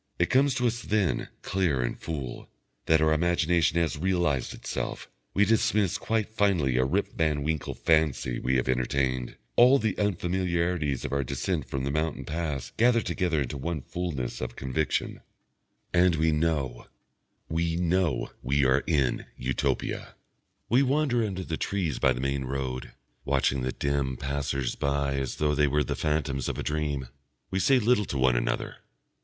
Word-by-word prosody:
It 85 - +1
comes 135 0 +4
to 125 - 0
us 120 0 0
then, 105 -4 0
clear 85 -10 +1
and - - -2
full, 70 -7 -6 0.4
that 80 -1 +4
our 80 0 +4
imagination 85 -1 +2
has 80 -3 0
realised 85 -7 +1
itself; - - -5 0.3
we 105 - +5
dismiss 105 -3 +2
quite 110 -2 0
finally 95 - +1
a 65 - +4
Rip 95 +9 0
Van 75 -3 0
Winkle 80 -1 -2
fancy 75 -6 +1
we 65 +1 0
have 65 - +1
entertained, 65 0 0 0.2
all 130 +3 +7
the 110 -6 0
unfamiliarities 90 -6 0
of - - -3
our 70 0 +1
descent 70 +2 -2
from 65 0 -2
the 70 - -1
mountain 75 +2 -1
pass 75 -6 -3
gather 115 0 +4
together 85 -6 0
into 70 +2 -5
one 80 +1 -3
fullness 80 -9 -4
of 60 -1 -4
conviction, 65 +2 -2 0.7
and 90 -1 +4
we 80 +1 +2
know, 75 -6 -1 0.6
we 80 +1 0
know, 90 0 +1
we 70 +2 +2
are 65 +2 +3
in 70 -7 +1
Utopia. 65 +1 -2 0.5
We 125 +4 +4
wander 135 -3 +2
under 95 -3 -3
the 80 -3 -3
trees 90 -9 -1
by 65 - +4
the 60 - -5
main 70 0 -1
road, 65 -1 -4 0.3
watching 70 -1 +1
the 65 +1 -1
dim 70 -2 -1
passers 70 -2 -2
by 70 -1 0
as 65 -2 -2
though 75 -1 +1
they 75 0 +3
were 75 +2 +2
the - - -3
phantoms 75 -3 -1
of - - -4
a - - -3
dream. 75 -3 -2 0.4
We 95 - 0
say 130 +9 +4
little 115 -2 +3
to 70 - -3
one 65 -2 +3
another. - - -1
75 Hz, 165 wpm, -27 LUFS, 70-90 Hz, 0.7 s, all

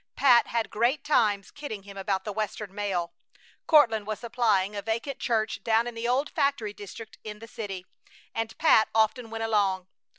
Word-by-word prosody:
Pat 250 -4 +5
had 230 -1 -1
great 245 +6 +1
times 215 -9 +2
kidding 285 -9 -7
him 200 0 -11
about 195 -1 -1
the 210 - -4
Western 210 -1 -4
mail. 195 -4 -2 0.5
Courtland 225 -10 +5
was 215 -1 -2
supplying 215 -4 +1
a 205 - -3
vacant 230 +6 -3
church 220 -3 -1
down 225 +1 +3
in 240 - -5
the 230 +1 -3
old 265 +4 +1
factory 255 -7 0
district 210 +2 -10
in 210 -1 -7
the 225 +2 -11
city, 205 -6 -6 0.5
and 225 0 -3
Pat 265 -9 +5
often 225 +2 +2
went 225 0 -4
along. 200 -4 +1
220 Hz, 175 wpm, -27 LUFS, 205-235 Hz, 0.5 s, Pat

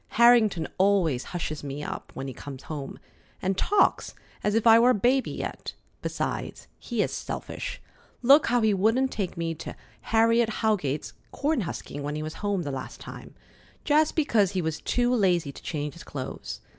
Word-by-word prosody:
Harrington 225 -8 +5
always 185 -9 +3
hushes 155 -4 -4
me 140 +1 -5
up - - -6
when 135 +1 -5
he 135 - -5
comes 135 +1 -9
home, 145 -3 -6 0.4
and 190 +1 0
talks 410 - +2 0.3
as 210 0 +1
if 225 - +1
I 225 0 +8
were 240 +2 +5
a - - +6
baby 250 +6 +2
yet. - - -5 0.3
Besides, - - -3
he - - -1
is - - -3
selfish. - - -5 0.4
Look 280 +5 +7
how 245 -1 +3
he 220 -1 +3
wouldn't 225 +7 +2
take 190 -4 -3
me 165 -1 -1
to 165 +1 -8 0.3
Harriet 230 +1 +4
Howegate's 165 -10 0 0.2
corn 290 -2 0
husking 150 -5 -5
when 145 +1 -3
he 155 - -3
was 155 0 -5
home 200 -3 0
the 145 - -3
last 135 -1 -6
time, - - -10 0.5
just 305 +1 +3
because 220 - +2
he 185 - 0
was 160 -1 -3
too 245 0 +1
lazy 180 - +2
to - - -12
change 150 -2 -4
his 170 - -11
clothes! 130 -2 -6
195 Hz, 180 wpm, -27 LUFS, 155-235 Hz, 0.5 s, I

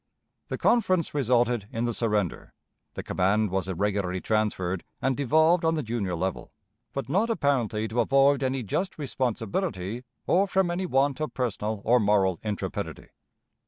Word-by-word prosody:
"The - - -3
conference 185 -8 +2
resulted 120 -5 +1
in 115 - -2
the 120 - -1
surrender. 105 -6 -1 0.4
The - - -5
command 100 +2 +1
was 95 -1 -1
irregularly 95 0 -1
transferred, 95 -4 -1 0.2
and 135 -1 0
devolved 160 +6 +3
on 160 0 +2
the 155 - -2
junior 110 -5 -2
general; 95 +2 -3 0.4
but 135 -4 -4
not 195 - +1
apparently 125 - 0
to 115 +2 -2
avoid 135 +3 +4
any 130 -1 -1
just 185 - -2
responsibility 120 - -2 0.2
or 195 +3 +3
from 190 -2 +1
any 180 +2 -2
want 135 -1 +1
of 155 - -3
personal 110 -4 -2
or 125 +2 +5
moral 100 -4 +2
intrepidity. 105 -2 -4
120 Hz, 150 wpm, -27 LUFS, 105-145 Hz, 0.4 s, or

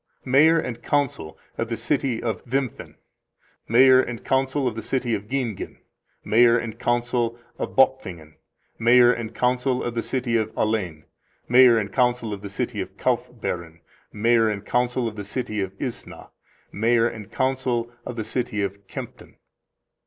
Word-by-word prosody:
Mayor 150 +6 +5
and 125 -6 -5
Council 135 - -1 0.2
of 115 - -2
the 115 - -2
City 120 0 -1
of 115 -2 -3
Wimpffen. 130 -1 -3 0.7
Mayor 130 +3 +6
and 120 -2 -6
Council 135 +1 +1
of 115 - -2
the 110 - -4
City 125 +1 -1
of 105 -1 -3
Giengen. 125 -5 -3 0.5
Mayor 115 +1 +5
and 115 -2 -5
Council 120 -1 0 0.2
of - - -4
Bopfingen. 95 - +1 0.5
Mayor 120 +1 +6
and 115 -1 -6
Council 125 +1 +1
of 120 - -3
the 115 - -1
City 120 +1 -1
of 110 -1 -1
Alen. 95 -8 -1 0.4
Mayor 125 -1 +7
and 105 -3 -2
Council 125 -3 +1
of 100 - -7
the 100 - -7
City 100 - -3
of - - -8
Kaufbeuren. 85 -2 -3 0.3
Mayor 115 +1 +3
and 105 -1 -4
Council 125 0 0
of 110 - -6
the 105 - -5
City 105 0 -3
of 95 -1 -3
Isna. 125 -4 -6 0.4
Mayor 115 +2 +2
and 110 -4 -8
Council 130 -3 -1
of 125 - -6
the 110 -2 -4
City 115 -2 -2
of 100 0 -5
Kempten. - - -9
120 Hz, 160 wpm, -24 LUFS, 110-125 Hz, 0.7 s, Mayor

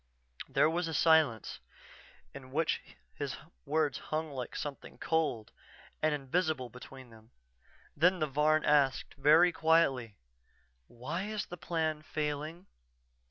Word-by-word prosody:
There - - +4
was 165 +2 -1
a 160 - -3
silence, 155 -9 +3 0.7
in 130 -2 -11
which 155 +3 0 0.3
his 135 - -4 0.3
words 150 -2 +1
hung 155 0 -3
like 130 -3 -6
something 145 -2 -6
cold 150 -9 -1 0.5
and 155 - +2
invisible 150 -2 -1
between 125 0 -12
them. 110 0 -17 0.7
Then 180 +2 +4
the 155 - 0
Varn 150 +2 +2
asked, 145 -3 +2
very 155 +6 +5
quietly: 140 -10 +2 0.7
"_Why 160 - -5
is 215 -1 -3
the 175 - -8
Plan 160 -1 -2
failing? 155 +3 -4
150 Hz, 120 wpm, -32 LUFS, 135-160 Hz, 0.7 s, very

